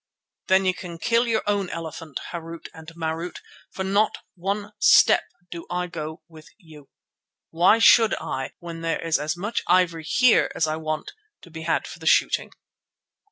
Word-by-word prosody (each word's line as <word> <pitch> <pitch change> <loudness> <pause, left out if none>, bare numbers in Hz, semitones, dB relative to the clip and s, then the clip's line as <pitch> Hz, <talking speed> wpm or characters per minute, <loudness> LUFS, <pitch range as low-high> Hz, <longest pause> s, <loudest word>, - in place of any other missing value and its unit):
"Then 190 0 +4
you 185 - +2
can 175 -2 -8
kill 230 +7 +1
your 225 -1 0
own 200 -3 0
elephant, 165 -3 -6
Harût 165 -1 -8
and 160 -1 -13
Marût, 165 +1 -4 0.3
for 190 - -5
not 200 +3 +1 0.2
one 200 +3 -3
step - - +6 0.3
do 170 -1 -8
I 180 0 -1
go 160 -2 -7
with 160 -2 -15
you. 155 -8 -16 0.6
Why 175 +6 +4
should 225 -1 +6
I 130 0 -5
when 170 -1 -8
there 165 0 -1
is 165 -1 0
as 155 +4 -2
much 210 +6 -2
ivory 175 -2 +2
here 245 +7 +3
as - - +1
I 155 0 -2
want, 155 -1 -4 0.3
to 175 - -15
be 160 0 -8
had 160 0 0
for - - -10
the - - -6
shooting?" - - +2
170 Hz, 170 wpm, -24 LUFS, 160-195 Hz, 0.6 s, step